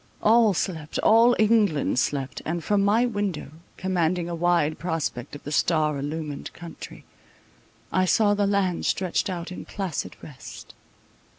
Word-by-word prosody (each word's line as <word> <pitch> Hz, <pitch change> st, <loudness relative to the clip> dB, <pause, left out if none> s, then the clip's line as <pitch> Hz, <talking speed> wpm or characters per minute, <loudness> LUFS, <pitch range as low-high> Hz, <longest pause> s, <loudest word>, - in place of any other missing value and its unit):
All 220 Hz, -2 st, +5 dB
slept—all 205 Hz, +9 st, +3 dB
England 210 Hz, -, +2 dB
slept; 135 Hz, +1 st, -2 dB
and 170 Hz, +1 st, -3 dB
from 205 Hz, -1 st, +2 dB
my 215 Hz, +4 st, +3 dB
window, 205 Hz, -, -3 dB, 0.3 s
commanding 180 Hz, -2 st, 0 dB
a 175 Hz, -, -4 dB
wide 170 Hz, -2 st, +1 dB
prospect 160 Hz, -7 st, -3 dB
of 145 Hz, -, -11 dB
the 145 Hz, -, -6 dB
star 155 Hz, -2 st, +1 dB
illumined 150 Hz, 0 st, -5 dB
country, 170 Hz, -1 st, -10 dB, 0.9 s
I 185 Hz, 0 st, +2 dB
saw 205 Hz, +2 st, +3 dB
the 205 Hz, -1 st, +1 dB
land 195 Hz, -3 st, 0 dB
stretched 185 Hz, +1 st, 0 dB
out 175 Hz, -1 st, -5 dB
in 180 Hz, -, -7 dB
placid 190 Hz, -6 st, -4 dB
rest. 140 Hz, -4 st, -11 dB
175 Hz, 135 wpm, -25 LUFS, 155-205 Hz, 0.9 s, All